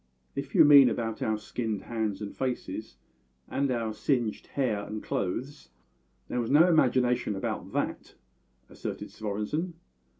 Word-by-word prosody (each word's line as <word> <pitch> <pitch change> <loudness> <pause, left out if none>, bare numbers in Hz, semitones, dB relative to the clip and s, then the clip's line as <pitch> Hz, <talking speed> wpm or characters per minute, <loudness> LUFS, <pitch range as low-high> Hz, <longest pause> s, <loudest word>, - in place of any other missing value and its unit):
"If 140 -1 -5
you - - +8
mean 140 -3 +9
about 115 0 -3
our 110 -1 +1
skinned 110 -1 -3
hands 110 -3 -2
and 100 - -6
faces, 125 - -4 0.5
and 140 0 0
our 115 -3 -1
singed 120 -2 -1
hair 115 -7 -1
and 105 +1 -6
clothes, 125 - -3 0.6
there 125 - -1
was 115 - -3
no 155 +5 +6
imagination 125 - +3
about 95 - -4
that," - - -3 0.5
asserted - - -6
Svorenssen. 110 - -3
120 Hz, 135 wpm, -29 LUFS, 105-135 Hz, 0.6 s, mean